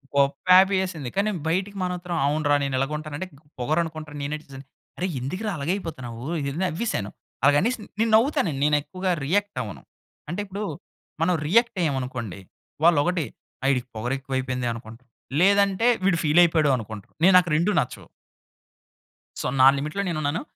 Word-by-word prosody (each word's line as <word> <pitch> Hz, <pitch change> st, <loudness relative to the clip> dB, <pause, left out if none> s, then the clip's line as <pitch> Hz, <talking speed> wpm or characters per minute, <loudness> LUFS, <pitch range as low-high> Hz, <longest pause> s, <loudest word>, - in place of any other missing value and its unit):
గొప్ప 140 Hz, 0 st, +3 dB, 0.2 s
హ్యాపీ 190 Hz, +1 st, +6 dB
యేసింది, 165 Hz, -9 st, -4 dB
కానీ 200 Hz, +2 st, +2 dB, 0.2 s
బయటికి 190 Hz, +4 st, -1 dB
మానత్తరం 180 Hz, -1 st, -3 dB
అవునురా 145 Hz, 0 st, +2 dB
నేను 135 Hz, -1 st, -1 dB
ఇలాగుంటాను 150 Hz, +2 st, -3 dB
అంటే, 185 Hz, -, -5 dB
గ్ -, -, -28 dB, 0.2 s
పొగరనుకుంటరు 155 Hz, +2 st, -2 dB
నేనేటిదని. 140 Hz, -2 st, -6 dB, 0.3 s
అరె 180 Hz, -, -1 dB
ఎందుకురా 185 Hz, -, -3 dB
అలాగయిపోతన్నావూ 140 Hz, -, -4 dB, 0.2 s
ఇదని 140 Hz, +4 st, -3 dB
నవ్వేశాను. 175 Hz, -, -2 dB, 0.3 s
అలాగనేసి 145 Hz, -, +4 dB, 0.2 s
నేను 225 Hz, 0 st, +2 dB
నవ్వుతానండి, 230 Hz, -, +2 dB
నేను 150 Hz, 0 st, +4 dB
ఎక్కువగా 185 Hz, +3 st, -2 dB
రియాక్టవ్వను. 145 Hz, -, -2 dB, 0.5 s
అంటే, 175 Hz, +5 st, -3 dB
ఇప్పుడు 200 Hz, +2 st, -5 dB, 0.6 s
మనం 180 Hz, +2 st, +3 dB
రియాక్టయ్యామనుకోండి. 140 Hz, -, 0 dB, 0.5 s
వాళ్ళొకటి 170 Hz, 0 st, +3 dB, 0.4 s
ఆహ్, 135 Hz, -, +3 dB
ఈడికి 125 Hz, -2 st, -1 dB
పొగరెఎక్కువైయిపోయింది 130 Hz, +1 st, -2 dB
అనుకుంటారు. 115 Hz, +2 st, -11 dB, 0.3 s
లేదంటే, 200 Hz, +3 st, +4 dB, 0.2 s
వీడు 185 Hz, -3 st, +3 dB
ఫీలయిపోయాడు 160 Hz, -1 st, +4 dB
అనుకుంటారు. 110 Hz, -3 st, -9 dB
నే 185 Hz, -, +8 dB
నాకు 180 Hz, -1 st, +3 dB
రెండూ 170 Hz, +7 st, +2 dB
నచ్చవు. -, -, -4 dB, 1.3 s
సో, -, -, -4 dB, 0.2 s
నా 130 Hz, -, +9 dB
లిమిట్‌లో 150 Hz, +7 st, -2 dB
నేనున్నాను. 155 Hz, -2 st, -1 dB
155 Hz, 130 wpm, -24 LUFS, 135-185 Hz, 1.3 s, నా